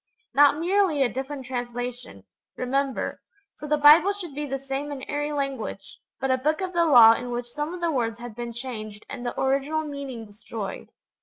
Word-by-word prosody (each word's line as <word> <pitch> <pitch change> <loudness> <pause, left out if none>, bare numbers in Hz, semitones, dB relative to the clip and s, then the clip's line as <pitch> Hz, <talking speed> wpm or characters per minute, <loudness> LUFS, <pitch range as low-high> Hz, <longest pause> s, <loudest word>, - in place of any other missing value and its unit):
Not 290 +2 +6
merely 345 -3 +2
a 240 -5 0
different 265 +1 -5
translation, 245 - -5 0.3
remember, 270 +1 -1 0.4
for 300 - -6
the 300 0 +2
Bible 305 +7 +7
should 360 -7 -8
be 295 +1 -4
the 270 0 -2
same 275 +2 -4
in 270 -2 -6
every 295 0 -2
language, 275 -8 -4 0.2
but 270 - 0
a 260 - +2
Book 305 +4 +1
of 375 -1 -3
the 340 -1 +3
Law 235 -6 +9
in 245 +2 -4
which 240 0 -3
some 295 +6 -4
of 360 0 -7
the 340 -1 +1
words 230 -5 -1
had 240 -1 -8
been 240 0 -5
changed 220 -4 -7
and 250 -3 -6
the 240 - -4
original 275 +4 +1
meaning 280 -6 -6
destroyed. 210 -1 -7
270 Hz, 190 wpm, -25 LUFS, 240-295 Hz, 0.4 s, Law